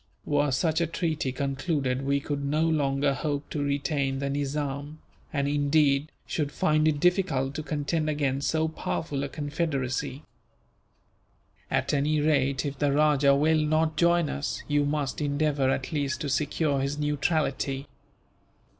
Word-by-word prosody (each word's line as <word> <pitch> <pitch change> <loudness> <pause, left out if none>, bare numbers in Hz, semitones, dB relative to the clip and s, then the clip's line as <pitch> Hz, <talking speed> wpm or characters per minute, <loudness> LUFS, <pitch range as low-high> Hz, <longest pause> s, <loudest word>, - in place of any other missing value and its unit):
Were 145 0 +2
such 160 +5 +1
a 170 - +1
treaty 160 -5 -1
concluded, 135 -1 -1
we 140 +1 +1
could 140 0 -3
no 150 +3 +1
longer 140 -3 +1
hope 145 +1 -3
to 150 - -2
retain 140 -1 0
the 140 0 -2
Nizam; 145 +1 -3 0.3
and 140 -2 0
indeed, 145 0 +2
should 145 -3 -2
find 155 +1 +2
it 150 -2 +1
difficult 170 -7 +1
to 155 - -4
contend 155 +1 -1
against 140 -2 0
so 160 0 +1
powerful 155 -2 -3
a 140 - -3
confederacy. 145 -3 -2 1.5
At - - 0
any 150 +2 +2
rate, 140 -2 +1
if 140 -1 -4
the 145 -1 +2
rajah 145 -1 +4
will 155 +2 +3
not 155 +1 +1
join 170 0 +3
us, 145 +1 -3
you 145 0 +2
must 145 -1 -2
endeavour 145 -2 +1
at 135 -1 -1
least 145 -3 -1
to 145 - -2
secure 150 0 0
his 140 +2 -1
neutrality. 145 -2 0
145 Hz, 145 wpm, -27 LUFS, 140-155 Hz, 1.5 s, rajah